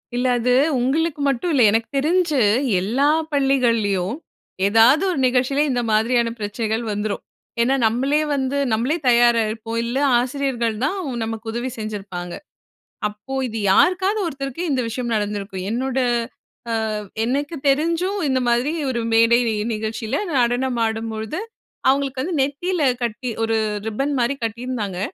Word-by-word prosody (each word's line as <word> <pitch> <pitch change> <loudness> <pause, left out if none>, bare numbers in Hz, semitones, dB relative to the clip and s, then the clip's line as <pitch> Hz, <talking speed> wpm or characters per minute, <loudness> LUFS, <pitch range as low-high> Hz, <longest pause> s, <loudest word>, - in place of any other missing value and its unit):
இல்ல 245 +1 0
அது 245 +1 +2 0.3
உங்களுக்கு 290 +4 0
மட்டும் 275 +6 -1
இல்ல. 270 - +3
எனக்கு 225 +1 +1
தெரிஞ்சு, 315 0 +2 0.4
எல்லா 245 +9 +1 0.3
பள்ளிகள்லயும் 230 -8 +1 0.5
ஏதாவது 230 - +5
ஒரு 335 - -2
நிகழ்ச்சில 255 +3 +1
இந்த 245 -2 0
மாதிரியான 230 +2 +2
பிரச்சனைகள் 220 +2 -2
வந்துரும். 210 0 -2 0.4
ஏன்னா, 260 +3 +3
நம்மளே 265 +7 +2
வந்து, 270 0 -1 0.2
நம்மளே 250 +9 +1
தயாரா 240 -1 +5
இருப்போம். 225 +1 -5
இல்ல, 235 +2 -2 0.2
ஆசிரியர்கள் 245 -3 -1
தான் 305 +9 0 0.3
நமக்கு 225 0 -5
உதவி 240 +3 -3
செஞ்சிருப்பாங்க. 195 -5 -6 0.7
அப்போ 210 +5 -9
இது 225 -1 -5
யாருக்காவது 375 - +3
ஒருத்தருக்கு 275 0 -4
இந்த 260 -2 +1
விஷயம் 235 +1 -3
நடந்திருக்கும். 205 -3 -3
என்னோட 260 +3 -2 0.7
அ - - 0 0.5
எனக்கு 285 +7 -1
தெரிஞ்சும் 335 +8 +1
இந்த 260 -1 +1
மாதிரி 240 +5 +2 0.2
ஒரு 245 -2 -1
மேடை 230 +1 +5 0.3
நிகழ்ச்சியில 220 +3 -3 0.2
நடனம் 245 +1 +1
ஆடும்பொழுது, 220 - -3 0.5
அவுங்களுக்கு 270 -1 +1
வந்து 345 +3 -2
நெத்தில 310 +6 -1 0.2
கட்டி, 240 +2 -3
ஒரு 225 0 +1 0.3
ரிப்பன்மாரி 270 +3 0
கட்டியிருந்தாங்க. 225 -4 -3
245 Hz, 125 wpm, -21 LUFS, 225-275 Hz, 0.7 s, ஏதாவது